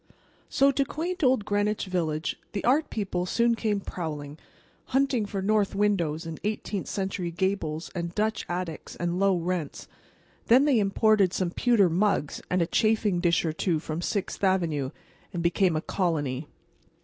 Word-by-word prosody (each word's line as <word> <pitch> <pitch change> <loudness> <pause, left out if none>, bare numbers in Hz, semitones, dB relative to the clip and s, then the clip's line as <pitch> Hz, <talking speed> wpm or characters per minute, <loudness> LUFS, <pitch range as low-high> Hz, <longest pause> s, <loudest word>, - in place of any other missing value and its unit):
So, 275 +1 +4
to 275 +1 +1
quaint 340 +5 -4
old 255 -5 +3
Greenwich 205 +1 0
Village 165 -4 -1 0.2
the 200 - -3
art 285 +6 +3
people 185 -4 -2
soon 235 +4 +2
came 215 -3 0
prowling, 150 -6 -6 0.5
hunting 265 -5 +1
for 195 -1 -3
north 210 -1 +1
windows 175 -6 +1
and 165 -1 -6
eighteenth 210 -2 -3
century 190 -3 -2
gables 170 -3 -2
and 170 -1 -4
Dutch 215 +1 0
attics 175 -2 -4
and 175 +1 -2
low 195 -2 +3
rents. 175 -3 -3 0.6
Then 255 +5 +6
they 275 -6 +4
imported 200 -1 +3
some 180 -2 -1
pewter 230 -2 +3
mugs 175 -3 0
and 180 -1 +2
a - - 0
chafing 210 0 +2
dish 170 -1 +2
or 160 - -1
two 165 +1 0
from 155 +1 -4
Sixth 200 +2 -3
avenue, 165 -8 +1 0.4
and 170 -2 -2
became 175 0 +2
a 155 - 0
"colony." 150 -7 -1
190 Hz, 160 wpm, -27 LUFS, 170-215 Hz, 0.6 s, Then